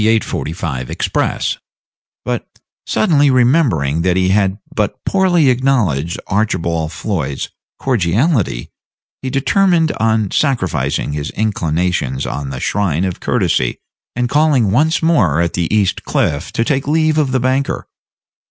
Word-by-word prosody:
45 75 -6 -4
express; - - -1 0.7
but - - -3 0.4
suddenly 145 +5 +3
remembering 120 - +2
that 90 +1 +1
he 95 0 +2
had 95 0 +2 0.2
but 105 -2 -1
poorly 175 -7 +3
acknowledged 110 - 0
Archibald 85 -6 -1
Floyd's 80 -7 -3 0.3
cordiality, 110 - 0 0.5
he 130 - -3
determined 160 +5 +2
on 110 -3 +1
sacrificing 90 - 0
his 75 +1 -3
inclinations 85 -9 -1
on 70 -1 -4
the 65 -2 -5
shrine 95 -2 0
of 90 -2 -4
courtesy, - - 0 0.4
and 125 0 0
calling 140 -6 +2
once 155 +9 +2
more 105 - +3
at 85 -1 0
the 85 -2 -1
East 105 -3 +1
Cliff 75 +3 -1
to 115 - 0
take 135 0 0
leave 155 0 +2
of 140 -4 +1
the 130 - +1
banker. 130 +2 0
105 Hz, 125 wpm, -17 LUFS, 85-135 Hz, 0.7 s, suddenly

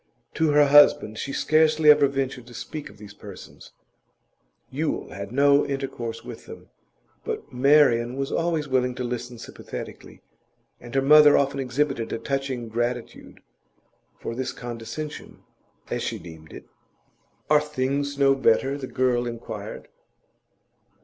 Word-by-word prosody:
To 160 -1 +1
her 145 0 +5
husband 145 -6 +5
she 140 - -4
scarcely 155 +1 +4
ever 145 -1 +5
ventured 135 -3 -4
to 120 - -13
speak 145 +5 -7
of - - -17
these 105 0 -12
persons; 100 -2 -13 1.0
Yule 150 +3 -3
had 100 +1 -7
no 140 +2 +4
intercourse 130 -4 -5
with - - -10
them. - - -12 0.5
But - - -6
Marian 125 -3 +4
was 135 0 -3
always 165 -3 -1
willing 125 -2 0
to 125 - -4
listen 120 0 -5
sympathetically, - - -10 0.6
and 120 +1 -11
her 135 - +2
mother 150 +1 +7
often 140 0 0
exhibited 135 -2 -1
a - - -2
touching 135 -1 -3
gratitude 120 +1 -4 0.8
for - - -5
this 130 +2 -4
condescension 120 +6 -8 0.5
as - - -2
she - - -3
deemed 80 -2 -13
it. - - -11 0.8
'Are 150 0 +4
things 140 -1 -2
no 140 -1 +4
better?' 135 +2 +1
the 130 - -6
girl 125 -2 0
inquired. 115 -1 -7
135 Hz, 135 wpm, -24 LUFS, 120-145 Hz, 1.0 s, mother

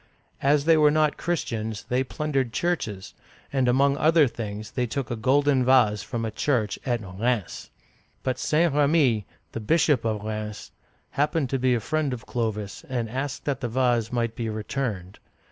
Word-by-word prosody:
As 140 +1 +3
they 165 -1 +5
were 150 -1 +6
not 155 0 +2
Chris 175 -1 -1
tians, 110 -2 -4
they 125 +1 +1
plundered 135 -3 -2
churches, 110 - -2 0.4
and 130 -2 +2
among 140 +3 +3
other 160 -1 +5
things 105 -2 -6
they 125 +1 -1
took 125 +1 -4
a - - 0
golden 135 +3 +3
vase 120 -5 +4
from 115 +2 -4
a 110 - -3
church 110 -4 0
at 120 -2 0
Rheims 95 -3 -9
(remz, - - -12
or 95 - -11
raNss). 120 -6 -1 0.5
But 130 -1 -1
St. 160 0 +2
R^mi - - -3
(ra 145 - +5
mee'), 130 - +3 0.3
the - - -5
bishop 150 +4 +2
of 110 -2 -2
Rheims, 105 -1 -5 0.4
happened 145 -1 0
to 135 - 0
be 125 0 +3
a - - 0
friend 150 +3 -1
of 120 -2 -7
Clovis, 105 -4 -3
and 120 -4 -2
asked 135 +2 -4
that 140 -3 -1
the 120 - -2
vase 120 -2 +1
might 115 -2 -1
be 115 -3 -3
returned. 110 -3 -4
125 Hz, 195 wpm, -25 LUFS, 110-140 Hz, 0.5 s, were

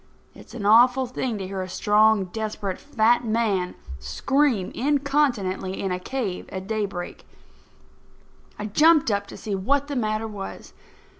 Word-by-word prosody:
It's - - -14
an 215 -4 -5
awful 245 +5 +5
thing 250 -2 -3
to 195 - -5
hear 190 0 -4
a 185 - -5
strong, 210 +1 +3
desperate, 205 -1 -4
fat 240 -4 +2
man 215 -5 0 0.2
scream 265 - 0
incontinently 265 -9 0
in 195 - -2
a 180 - -2
cave 210 -3 -4
at 190 0 -6
daybreak. 200 -4 -4 1.3
I 210 - -5
jumped 300 +4 +4
up 200 0 -1
to - - -10
see 215 - -5
what 275 +9 0
the 285 - -3
matter 215 -2 -1
was. 205 -3 -8
215 Hz, 145 wpm, -24 LUFS, 195-255 Hz, 1.3 s, awful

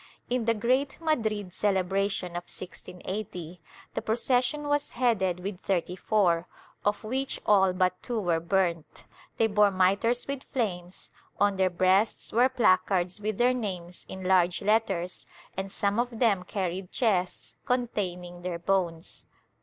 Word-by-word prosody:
In 245 -2 +1
the 230 0 +3
great 255 +6 +1
Madrid 220 - -1
celebration 195 -1 0
of 175 0 -5
1680, 180 -1 -7 0.3
the - - -2
procession 245 +5 +1
was 290 0 0
headed 200 -8 +1
with 190 -1 -5
thirty 180 -2 -1
four, 180 -4 +2 0.4
of 205 0 0
which 260 +5 -2
all 190 -2 +5
but 185 0 0
two 240 -2 -2
were 175 -5 +1
burnt; 170 -2 -1 0.3
they 225 - +4
bore 210 -1 +4
mitres 200 +6 +2
with 280 -1 -3
flames, 185 -8 -3 0.3
on 200 -1 +3
their 190 -1 +3
breasts 185 +4 +2
were 245 +3 +5
placards 185 -5 +2
with 215 -1 -2
their 250 +1 +4
names 180 -7 -5
in 190 0 -7
large 180 -1 +3
letters 195 -4 0 0.3
and 190 0 -4
some 200 +2 0
of 240 -1 -1
them 205 -6 +2
carried 185 -1 -3
chests 190 -7 0
containing 180 -8 -2
their 175 -1 -3
bones. 170 -2 -2
195 Hz, 140 wpm, -28 LUFS, 180-225 Hz, 0.4 s, all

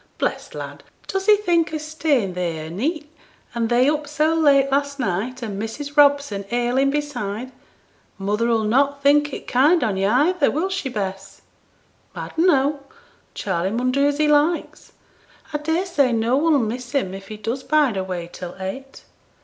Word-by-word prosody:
bless - - -2
t' - - -10
lad, - - -7 0.2
does 385 +1 -3
he 420 -1 +7
think 345 -6 +1
o' 315 - -2
staying 305 - -1
theere 170 -3 -3
a' - - -7
neet, 300 - -3 0.4
and 230 -1 -1
they 245 +2 +4
up 300 0 0
so 305 +2 +1
late 280 -4 +4
last 280 0 0
night, 235 +4 -2
and 205 -3 -4
Mrs. 285 +6 -6
Robson 285 -8 +3
ailing 245 +3 +1
beside? 255 -5 -3 0.7
Mother 210 +4 0
'll 225 -1 +2
not 280 +6 +1
think 290 +1 +4
it - - -7
kind 290 +5 +3
on 210 -5 0
yo' 195 +1 +1
either, 290 - +3
will 330 +7 -1
she, 380 -8 -3
Bess?' 195 -4 -5 0.7
'I - - -6
dunno. 295 -4 +3 0.6
Charley 190 - -1
mun 245 +4 0
do 280 +2 +2
as 290 0 0
he 305 0 +2
likes; 300 +3 0 0.6
I 295 - -1
daresay 320 -3 +1
no 230 +2 +1
one'll 305 +1 +3
miss 245 +1 -3
him 220 -10 0
if 195 0 -9
he 215 - -8
does 230 +5 -3
bide 290 -5 +2
away 185 -3 -4
till 180 -1 -7
eight.' 265 +9 -7
270 Hz, 175 wpm, -22 LUFS, 220-295 Hz, 0.7 s, he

